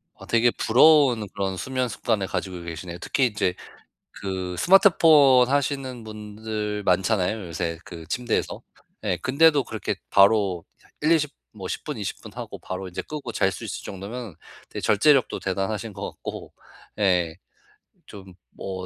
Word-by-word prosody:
아 -, -, -13 dB
되게 115 Hz, +1 st, +3 dB
부러운 130 Hz, -3 st, +4 dB
그런 95 Hz, -2 st, -2 dB
수면 130 Hz, +2 st, -2 dB
습관을 105 Hz, -6 st, -1 dB
가지고 90 Hz, -3 st, -4 dB
계시네요. 85 Hz, +1 st, -7 dB
특히 135 Hz, -, +1 dB
이제 105 Hz, -5 st, -1 dB, 0.6 s
그 95 Hz, -2 st, -5 dB
스마트폰 155 Hz, -, +6 dB
하시는 135 Hz, -4 st, -1 dB
분들 105 Hz, -1 st, -5 dB
많잖아요, 95 Hz, +2 st, +1 dB
요새 85 Hz, 0 st, -3 dB
그 80 Hz, -1 st, -10 dB
침대에서. 120 Hz, -2 st, -2 dB, 0.4 s
예. 90 Hz, -, 0 dB
근데도 145 Hz, +1 st, +4 dB
그렇게 110 Hz, -1 st, -3 dB, 0.2 s
바로 100 Hz, -4 st, +4 dB, 0.4 s
1-20 150 Hz, -1 st, +2 dB, 0.2 s
뭐 95 Hz, -3 st, -7 dB
10 -, -, -5 dB
분 150 Hz, -6 st, -5 dB
20 100 Hz, -, -5 dB
분 -, -, -11 dB
하고 -, -, -7 dB
바로 95 Hz, 0 st, -6 dB
이제 90 Hz, -, -5 dB
끄고 145 Hz, -5 st, -6 dB
잘 95 Hz, -1 st, +1 dB
수 -, -, -8 dB
있을 -, -, -5 dB
정도면 100 Hz, +1 st, -7 dB, 0.4 s
되게 -, -, -5 dB
절제력도 130 Hz, +6 st, +3 dB
대단하신 100 Hz, +3 st, -2 dB
것 100 Hz, 0 st, -5 dB
같고. -, -, -8 dB, 0.5 s
예. 90 Hz, -5 st, +2 dB, 0.7 s
좀 95 Hz, -2 st, -12 dB, 0.2 s
뭐 95 Hz, -1 st, -6 dB
105 Hz, 280 characters per minute, -24 LUFS, 95-130 Hz, 0.7 s, 스마트폰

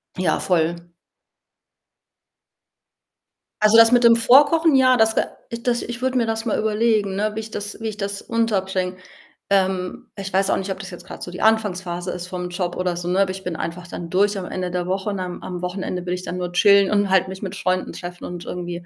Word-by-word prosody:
Ja, 180 Hz, -4 st, 0 dB
voll. 170 Hz, -1 st, 0 dB, 2.7 s
Also, 215 Hz, +1 st, +5 dB
das 230 Hz, 0 st, +8 dB
mit 245 Hz, 0 st, +5 dB
dem 230 Hz, -1 st, +7 dB
Vorkochen, 285 Hz, +7 st, +5 dB
ja, 255 Hz, -1 st, +5 dB
das 220 Hz, -1 st, +3 dB
ge -, -, +3 dB, 0.4 s
das 245 Hz, -1 st, +1 dB
ich 240 Hz, 0 st, -6 dB
würde 260 Hz, 0 st, 0 dB
mir 235 Hz, -, +2 dB
das 225 Hz, +1 st, -2 dB
mal 225 Hz, -, 0 dB
überlegen, 215 Hz, -2 st, +1 dB
ne, 210 Hz, +2 st, 0 dB
wie -, -, -2 dB
ich 220 Hz, 0 st, -6 dB
das 210 Hz, +1 st, -6 dB
wie 225 Hz, -, -3 dB
ich 210 Hz, -1 st, -5 dB
das 200 Hz, -1 st, -4 dB
unterbringe. 190 Hz, -5 st, -1 dB, 0.5 s
Ähm, 190 Hz, -2 st, 0 dB
ich 195 Hz, -1 st, -5 dB
weiß 195 Hz, +1 st, +2 dB
auch -, -, +2 dB
nicht, 190 Hz, +1 st, -3 dB
ob 190 Hz, -, -5 dB
das 195 Hz, -1 st, -8 dB
jetzt 175 Hz, -, -10 dB
grad -, -, -8 dB
so 175 Hz, -, -7 dB
die 180 Hz, -, -7 dB
Anfangsphase 185 Hz, -5 st, 0 dB
ist 180 Hz, 0 st, -6 dB
vom 180 Hz, -1 st, -5 dB
Job 175 Hz, 0 st, -3 dB
oder 180 Hz, -1 st, -1 dB
so, 175 Hz, 0 st, -5 dB
ne? 180 Hz, +2 st, +1 dB
Aber 195 Hz, -1 st, +1 dB
ich 190 Hz, 0 st, -8 dB
bin 180 Hz, -2 st, -4 dB
einfach 170 Hz, +2 st, -5 dB
dann 170 Hz, -1 st, -7 dB
durch 200 Hz, +3 st, +2 dB
am 190 Hz, -, -4 dB
Ende 180 Hz, 0 st, -4 dB
der 180 Hz, 0 st, -2 dB
Woche 190 Hz, +2 st, -1 dB
und 200 Hz, -2 st, -3 dB
am 180 Hz, -1 st, -5 dB
am 180 Hz, -1 st, -6 dB
Wochenende 180 Hz, 0 st, -4 dB
will 180 Hz, -, -2 dB
ich 180 Hz, 0 st, -4 dB
dann 180 Hz, -, -5 dB
nur 180 Hz, -1 st, -3 dB
chillen 200 Hz, +2 st, +5 dB
und 205 Hz, -1 st, +2 dB
halt 190 Hz, -1 st, +3 dB
mich 190 Hz, 0 st, -8 dB
mit 195 Hz, -1 st, -5 dB
Freunden 185 Hz, -1 st, -1 dB
treffen 175 Hz, 0 st, -8 dB
und 175 Hz, -1 st, -7 dB
irgendwie, 175 Hz, -1 st, -6 dB
190 Hz, 225 wpm, -22 LUFS, 180-215 Hz, 2.7 s, das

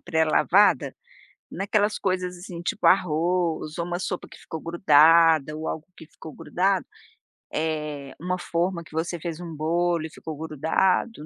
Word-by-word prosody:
pré-lavada, 160 Hz, +4 st, +3 dB, 0.6 s
naquelas 205 Hz, +1 st, 0 dB
coisas, 185 Hz, -1 st, -1 dB
assim, 175 Hz, -1 st, -8 dB
tipo, 190 Hz, -, -4 dB
arroz 170 Hz, -2 st, +1 dB
ou 170 Hz, -, -2 dB
uma 175 Hz, 0 st, -3 dB
sopa 180 Hz, -1 st, -4 dB
que -, -, -14 dB
ficou 160 Hz, -, -8 dB
grudada 160 Hz, -2 st, +4 dB
ou 160 Hz, -, -4 dB
algo 160 Hz, -, -5 dB
que -, -, -12 dB
ficou 160 Hz, -1 st, -12 dB
grudado, 190 Hz, +1 st, 0 dB, 0.7 s
eh, 150 Hz, -3 st, -3 dB
uma 180 Hz, +2 st, -2 dB
forma 170 Hz, 0 st, -2 dB
que -, -, -17 dB
você 165 Hz, +1 st, -2 dB
fez 165 Hz, 0 st, -5 dB
um 170 Hz, -2 st, -7 dB
bolo 170 Hz, +2 st, 0 dB
e -, -, -6 dB
ficou 155 Hz, 0 st, -8 dB
grudado, 160 Hz, -, 0 dB
170 Hz, 150 wpm, -25 LUFS, 155-180 Hz, 0.7 s, grudada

